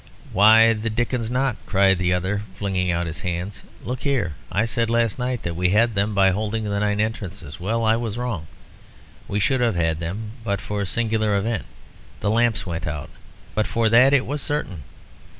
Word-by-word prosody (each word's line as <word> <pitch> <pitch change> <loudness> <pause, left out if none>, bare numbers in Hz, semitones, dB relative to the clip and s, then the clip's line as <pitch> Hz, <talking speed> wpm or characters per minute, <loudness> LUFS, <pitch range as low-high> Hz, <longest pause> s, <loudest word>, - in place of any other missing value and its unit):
"Why 110 +3 +7
the 110 +1 -3
dickens 115 0 -1
not?" 125 -1 0
cried 95 -2 +3
the 90 0 +1
other, 95 +3 0 0.2
flinging 95 -3 -1
out 85 0 0
his 80 -3 -6
hands. 90 +3 -4 0.2
"Look 125 +1 -4
here. 135 - 0 0.2
I 105 +4 +1
said 115 0 -1
last 115 -1 +1
night 125 -2 -2
that 85 -1 -3
we 90 +1 +1
had 115 +4 +3
them 100 +1 0
by 95 -1 +5
holding 110 +3 -2
the 100 -1 -1
nine 105 0 0
entrances. 100 -7 -4
Well, 115 +6 -1
I 110 0 +4
was 115 -2 -3
wrong. 115 -10 -3 0.8
We 100 - -1
should 130 +5 +1
have 115 -5 +2
had 80 -2 0
them 100 +6 -4
but 100 -3 -1
for 105 -1 -4
a - - -1
singular 110 -1 +1
event 110 +1 -1 0.5
the 105 - 0
lamps 115 0 +2
went 85 -2 -4
out. 75 -1 -5 0.4
But 110 - 0
for 115 -1 +1
that 125 +4 +6
it 140 -2 +3
was 145 +1 -2
certain. 145 - -3
105 Hz, 195 wpm, -23 LUFS, 95-115 Hz, 0.8 s, Why